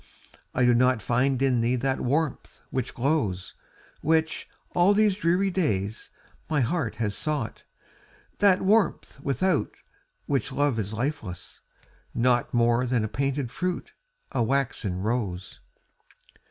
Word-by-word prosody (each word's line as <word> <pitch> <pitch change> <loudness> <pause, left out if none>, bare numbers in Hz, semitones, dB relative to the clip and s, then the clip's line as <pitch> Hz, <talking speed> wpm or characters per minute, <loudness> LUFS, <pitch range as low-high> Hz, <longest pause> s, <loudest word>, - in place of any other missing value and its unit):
I 125 - +3
do 125 - +5
not 125 0 +3
find 125 +5 +1
in 125 -3 +3
thee 120 +2 +2
that 130 +2 0
warmth 145 +3 -1
which 130 -2 -3
glows, 120 - 0 0.5
Which, 160 +1 +1 0.2
all 185 +4 +4
these 210 -2 +3
dreary 190 +1 +2
days, 110 - -1 0.4
my 155 -2 +2
heart 125 -2 -1
has 110 -3 -2
sought, 150 -7 -3 0.7
That 195 -2 +4
warmth 200 -7 +2
without 140 +5 +1 0.6
which 135 -5 -1
love 145 -5 +1
is 105 -1 -3
lifeless, 110 - -4 0.5
naught 120 0 +2
More 120 +1 +3
than 120 -3 +1
a - - 0
painted 135 +1 -2
fruit, 180 +3 -3 0.4
a 130 - 0
waxen 115 -7 -1
rose. 105 -5 -2
130 Hz, 125 wpm, -26 LUFS, 115-155 Hz, 0.7 s, do